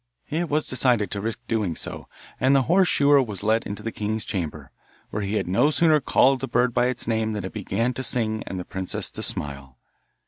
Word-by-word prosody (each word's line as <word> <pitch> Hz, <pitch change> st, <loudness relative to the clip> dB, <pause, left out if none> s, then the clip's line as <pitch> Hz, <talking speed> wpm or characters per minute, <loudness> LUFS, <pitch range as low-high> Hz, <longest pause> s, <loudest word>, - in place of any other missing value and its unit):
It 165 Hz, +2 st, -1 dB
was 150 Hz, +1 st, 0 dB
decided 120 Hz, -6 st, +2 dB
to 100 Hz, -, -2 dB
risk 115 Hz, +2 st, -3 dB
doing 105 Hz, -8 st, -1 dB
so, -, -, -4 dB, 0.3 s
and 130 Hz, +2 st, +4 dB
the 135 Hz, -, +4 dB
horse 180 Hz, +7 st, +3 dB
shoer 145 Hz, 0 st, +4 dB
was 105 Hz, -5 st, -5 dB
led 110 Hz, +2 st, +1 dB
into 105 Hz, +1 st, -6 dB
the 115 Hz, -, -3 dB
king's 110 Hz, 0 st, -3 dB
chamber, 80 Hz, -, -4 dB, 0.4 s
where 105 Hz, -, -3 dB
he 100 Hz, +1 st, -2 dB
had -, -, -1 dB
no 120 Hz, +11 st, +3 dB
sooner 155 Hz, 0 st, +4 dB
called 135 Hz, +1 st, +3 dB
the 135 Hz, -, -4 dB
bird 125 Hz, 0 st, +1 dB
by 125 Hz, -, +2 dB
its 125 Hz, -3 st, -2 dB
name 110 Hz, -1 st, 0 dB
than 105 Hz, -3 st, -4 dB
it 95 Hz, -, -7 dB
began 115 Hz, +4 st, -1 dB
to 130 Hz, -, -3 dB
sing 110 Hz, -3 st, +1 dB
and 95 Hz, -, -4 dB
the 90 Hz, -, -6 dB
princess 95 Hz, -1 st, -3 dB
to -, -, -7 dB
smile. 70 Hz, -3 st, -2 dB
110 Hz, 220 wpm, -24 LUFS, 100-130 Hz, 0.4 s, and